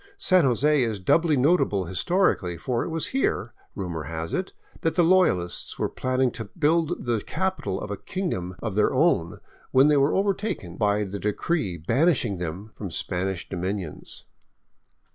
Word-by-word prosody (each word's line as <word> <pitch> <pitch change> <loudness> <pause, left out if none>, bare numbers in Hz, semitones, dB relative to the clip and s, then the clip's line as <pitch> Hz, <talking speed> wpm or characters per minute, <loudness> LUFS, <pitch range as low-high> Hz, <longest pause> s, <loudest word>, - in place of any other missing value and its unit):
San 185 - +4
Jose 140 +4 +3
is 110 -4 -1
doubly 155 - +3
notable 130 - +2
historically, 95 - +1
for 120 +7 -1
it - - -4
was 165 -1 -2
here, 260 - 0 0.2
rumor 85 -6 -4
has 80 +2 -5
it, 185 - -2 0.3
that 165 - 0
the 175 - +4
Loyalists 165 - +2
were - - -1
planning 130 0 0
to 115 - -6
build 160 -1 +1
the 115 -3 0
capital 190 - -2
of 105 - -6
a 100 - -3
kingdom 95 - -4
of 110 -3 -2
their 105 +1 +3
own 130 - +2 0.3
when 135 +3 +5
they 150 - +4
were 140 +2 +3
overtaken 195 - -1
by 105 0 +1
the 100 0 -5
decree 105 - -1
banish 130 - +2
ing 100 -5 -3
them 90 +6 -5
from 100 - -6
Spanish 90 +2 -3
dominions. 95 -2 -5
115 Hz, 160 wpm, -25 LUFS, -, 0.3 s, when